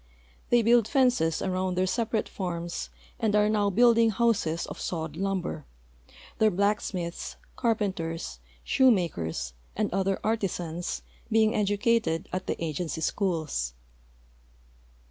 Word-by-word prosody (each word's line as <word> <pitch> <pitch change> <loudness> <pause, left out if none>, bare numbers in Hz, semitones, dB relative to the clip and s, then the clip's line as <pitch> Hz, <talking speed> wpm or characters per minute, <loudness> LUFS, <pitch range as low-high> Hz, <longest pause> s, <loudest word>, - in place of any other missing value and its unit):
They 240 -1 +4
build 230 -1 +5
fences 245 - +2
around 185 0 -1
their 185 +1 +2
separate 225 +2 0
farms 175 -2 -4 0.3
and 220 -3 +1
are 210 0 +4
now 210 -1 +2
building 230 +2 +5
houses 205 -7 +1
of - - -8
sawed 160 -3 -3
lumber, 185 -4 -2 0.7
their 220 - +5
blacksmiths, 190 -3 -1 0.2
carpenters, 190 -8 -1 0.2
shoemakers, 90 - +2 0.2
and 215 -3 -1
other 195 0 +1
artisans 180 -6 -2 0.3
being 220 0 +4
educated 205 -4 +1
at 185 0 -3
the - - 0
agency 160 +1 -3
schools. 155 - -1
195 Hz, 110 wpm, -28 LUFS, 170-220 Hz, 0.7 s, build